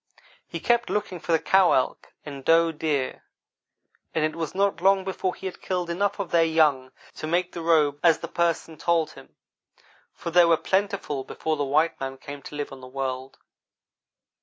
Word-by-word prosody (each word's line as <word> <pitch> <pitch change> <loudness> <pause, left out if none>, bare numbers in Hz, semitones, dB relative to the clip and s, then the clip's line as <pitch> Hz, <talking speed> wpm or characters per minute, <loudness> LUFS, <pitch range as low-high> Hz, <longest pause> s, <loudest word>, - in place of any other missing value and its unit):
He - - -5
kept 235 0 +1
looking 205 -4 -2
for 170 - -4
the 165 - +5
cow 185 +3 +4
elk 130 - -1
and 140 -2 -8
doe 165 +2 +4
deer, 150 -4 -2 0.9
and 155 - +2
it 155 - -2
was 165 -1 -4
not 195 -3 +1
long 195 +1 +4
before 185 -1 -2
he - - -11
had 190 - -6
killed 180 -2 -2
enough 200 +4 0
of 195 -4 -4
their 170 -1 +5
young 150 -5 +2 0.3
to 155 - -5
make 175 +2 0
the 170 - -6
robe 155 -3 +3
as 165 -3 +5
the - - -6
Person 165 -2 -1
told 170 -2 +1
him, - - -16 0.8
for 170 - -6
they 175 +1 +7
were 170 -1 +4
plentiful 190 -8 -1
before 160 +4 -3
the 145 - -1
white 155 +4 +1
man 135 0 -5
came 140 +1 -9
to 145 - -10
live 145 0 -4
on 135 -1 -10
the 130 - -10
world. 130 0 -4
165 Hz, 190 wpm, -25 LUFS, 145-180 Hz, 0.9 s, they